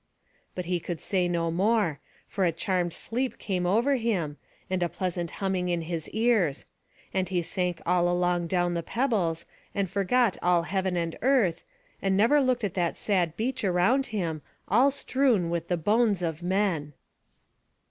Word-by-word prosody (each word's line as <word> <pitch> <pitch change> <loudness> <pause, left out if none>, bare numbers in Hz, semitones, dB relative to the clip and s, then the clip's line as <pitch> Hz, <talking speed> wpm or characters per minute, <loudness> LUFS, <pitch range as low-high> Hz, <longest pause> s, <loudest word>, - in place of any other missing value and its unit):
But 180 - -4
he 175 0 0
could 170 -1 -5
say 185 -3 0
no 170 -1 0
more; 195 -3 +1 0.3
for 195 - -2
a 175 - +3
charmed 175 +1 -1
sleep 245 +9 -3
came 180 -3 -2
over 240 +9 +3
him, 185 -11 -1 0.3
and 185 -1 -1
a 175 - +1
pleasant 175 -2 -3
humming 190 -1 -2
in 175 -1 0
his 165 -1 -4
ears; 220 - +1 0.5
and 185 -2 0
he 180 -2 0
sank 175 -2 -2
all 175 0 +3
along 175 0 +1
upon 175 0 0
the 170 - -1
pebbles, 200 -7 -1 0.3
and 200 -1 0
forgot 200 +4 +1
all 175 -1 +3
heaven 190 0 -1
and 165 -1 -3
earth, 235 -10 +2 0.4
and 190 -1 +1
never 240 +8 +5
looked 255 -3 +1
at 200 -5 -1
that 175 -3 -1
sad 180 -6 0
beach 255 +3 -2
around 195 +9 +2
him, 170 -9 -3 0.3
all 245 +8 +5
strewn 255 -10 +1
with 170 -1 -2
the 175 - 0
bones 205 +2 +2
of 165 -1 -2
men. 175 -5 0
180 Hz, 170 wpm, -27 LUFS, 170-215 Hz, 0.5 s, never